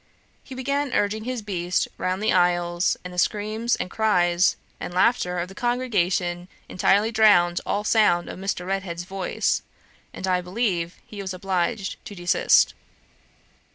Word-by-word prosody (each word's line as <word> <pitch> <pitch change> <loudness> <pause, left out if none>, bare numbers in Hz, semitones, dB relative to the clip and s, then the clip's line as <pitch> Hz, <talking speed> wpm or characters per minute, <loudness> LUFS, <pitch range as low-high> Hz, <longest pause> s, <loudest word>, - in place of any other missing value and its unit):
He 265 - -10
began 280 +1 -1
urging 215 +2 0
his 250 -3 -3
beast 180 -3 -1
round 185 +3 -1
the 220 - +2
aisles, 175 -1 +2
and 180 0 -8
the 180 - -2
screams, 215 +5 0
and 185 - -5
cries, 180 -5 +2 0.2
and 175 - -6
laughter 185 -3 +2
of 175 +1 -2
the 190 - -12
congregation 185 -7 -1 0.2
entirely 205 +4 +2
drowned 200 -6 +4
all 205 - 0
sound 210 -6 +3
of - - -7
Mr. 190 -2 -3
Redhead's 185 -3 -3
voice, 190 +1 -1 0.5
and, - - -6
I 180 -1 +2
believe, 180 -3 -2
he 205 -2 -8
was 190 -1 -5
obliged 190 +2 -2
to 205 - -8
desist. 175 -1 +3
190 Hz, 150 wpm, -24 LUFS, 175-215 Hz, 0.5 s, drowned